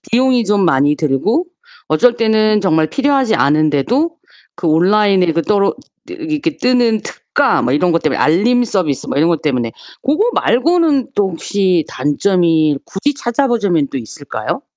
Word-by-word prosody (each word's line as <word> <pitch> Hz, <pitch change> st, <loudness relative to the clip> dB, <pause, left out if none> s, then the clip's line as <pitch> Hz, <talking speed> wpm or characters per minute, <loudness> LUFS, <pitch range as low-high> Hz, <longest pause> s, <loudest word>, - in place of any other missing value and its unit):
비용이 250 Hz, 0 st, +2 dB
좀 205 Hz, -1 st, +1 dB
많이 145 Hz, -1 st, +2 dB
들고 165 Hz, -, -1 dB, 0.4 s
어쩔 235 Hz, +10 st, +3 dB
때는 215 Hz, -2 st, +2 dB
정말 160 Hz, -5 st, +1 dB
필요하지 275 Hz, -5 st, +1 dB
않은데도 155 Hz, -, +1 dB, 0.4 s
그 175 Hz, -1 st, -5 dB
온라인에 190 Hz, +4 st, +3 dB
그 165 Hz, -, 0 dB
떨어 200 Hz, +1 st, +1 dB, 0.4 s
이 -, -, -7 dB
이렇게 320 Hz, -2 st, -3 dB
뜨는 240 Hz, -3 st, +1 dB
특가 -, -, -1 dB
뭐 125 Hz, -, 0 dB
이런 170 Hz, +4 st, +1 dB
것 165 Hz, -, 0 dB
때문에 155 Hz, -, -1 dB
알림 220 Hz, +11 st, +2 dB
서비스 180 Hz, -, -2 dB
뭐 -, -, -4 dB
이런 160 Hz, +4 st, +3 dB
것 165 Hz, -, 0 dB
때문에 125 Hz, -6 st, -2 dB, 0.3 s
고거 340 Hz, -, +1 dB
말고는 300 Hz, 0 st, +1 dB
또 200 Hz, -2 st, 0 dB
혹시 180 Hz, -1 st, -1 dB
단점이 160 Hz, -1 st, +1 dB
굳이 285 Hz, +10 st, -3 dB
찾아보자면 230 Hz, -, 0 dB
또 -, -, -5 dB
있을까요? 115 Hz, -4 st, -6 dB
200 Hz, 325 characters per minute, -15 LUFS, 155-245 Hz, 0.4 s, 어쩔